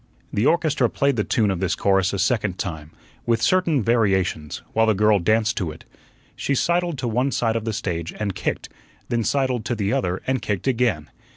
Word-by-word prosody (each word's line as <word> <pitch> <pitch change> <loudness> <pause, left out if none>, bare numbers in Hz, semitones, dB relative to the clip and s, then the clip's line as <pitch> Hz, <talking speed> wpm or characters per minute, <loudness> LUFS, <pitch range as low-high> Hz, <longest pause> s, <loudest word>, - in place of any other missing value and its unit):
The 110 +7 +2
orchestra 150 -7 +2
played 140 -1 +1
the 105 - 0
tune 105 -2 +1
of 95 - -2
this 90 -2 0
chorus 95 -1 +2
a 100 - -2
second 100 -4 0
time, 80 -5 -5 0.4
with 115 -1 +2
certain 170 - +2
variations, 95 -9 0
while 110 0 +3
the 110 - +3
girl 105 0 +4
danced 110 +4 +1
to 90 -5 -1
it. 80 +1 -11 0.5
She 140 - -1
sidled 170 +2 0
to 125 - -3
one 125 +4 +1
side 115 -3 0
of 115 -1 -2
the 115 - -1
stage 85 -4 -3
and 105 -2 -3
kicked, - - -3 0.4
then 120 -1 0
sidled 130 -2 0
to 120 - -1
the 105 -1 -1
other 90 0 -1
and 130 -1 0
kicked 105 -3 -3
again. 115 - 0
110 Hz, 200 wpm, -23 LUFS, 95-125 Hz, 0.5 s, girl